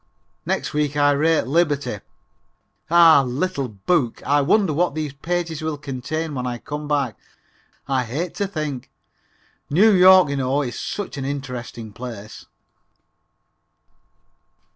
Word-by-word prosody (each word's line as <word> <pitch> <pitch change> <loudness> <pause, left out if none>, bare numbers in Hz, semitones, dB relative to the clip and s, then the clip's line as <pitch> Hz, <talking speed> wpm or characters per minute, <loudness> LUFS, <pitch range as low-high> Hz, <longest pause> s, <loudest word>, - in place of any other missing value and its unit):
Next - - -2
week 150 -1 -1
I 145 0 +4
rate 155 +3 +2
liberty! 145 - 0 0.9
Ah, 165 -3 +7
little 140 +3 -2
book, 120 - -1
I 145 +1 +3
wonder 190 +3 +2
what 170 0 0
these 155 -3 -3
pages 165 +2 -3
will 155 -1 -3
contain 150 +3 -4
when 125 -2 -3
I 120 -1 -3
come 150 +4 -6
back. 140 -7 -1 0.7
I 130 -2 0
hate 155 +9 -4
to 200 - -1
think. 150 -8 -5 0.8
New 200 +9 +5
York, 185 -3 +7
you 140 - -2
know, 135 +2 0
is 120 -3 -5
such 205 -7 -5
an 135 - -4
interesting 125 -5 -6
place. 110 -3 -9
145 Hz, 130 wpm, -22 LUFS, 130-165 Hz, 0.9 s, Ah